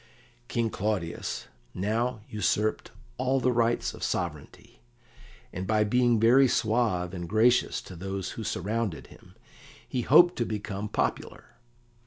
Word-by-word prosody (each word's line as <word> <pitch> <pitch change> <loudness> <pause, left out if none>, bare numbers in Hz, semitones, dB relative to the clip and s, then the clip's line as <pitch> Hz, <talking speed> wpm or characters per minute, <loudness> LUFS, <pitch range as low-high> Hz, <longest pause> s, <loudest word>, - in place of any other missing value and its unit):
King 115 -2 -1
Claudius 95 -5 -3 0.3
now 110 +5 -1
usurped 105 0 -1 0.3
all 130 +1 +1
the 125 0 +2
rights 120 -1 +1
of - - -12
sovereignty, 75 -6 -4 0.7
and 95 +1 -4
by 110 -1 +3
being 120 +1 +2
very 125 +5 +6
suave 110 -7 0
and 85 -2 -6
gracious 115 +4 +3
to 90 - -10
those 95 +2 -4
who 115 - -6
surrounded 105 -1 -2
him - - -19 0.5
he 125 - -2
hoped 175 +8 +6
to 120 - +1
become 105 -1 -4
popular. - - -3
110 Hz, 130 wpm, -27 LUFS, 95-120 Hz, 0.7 s, very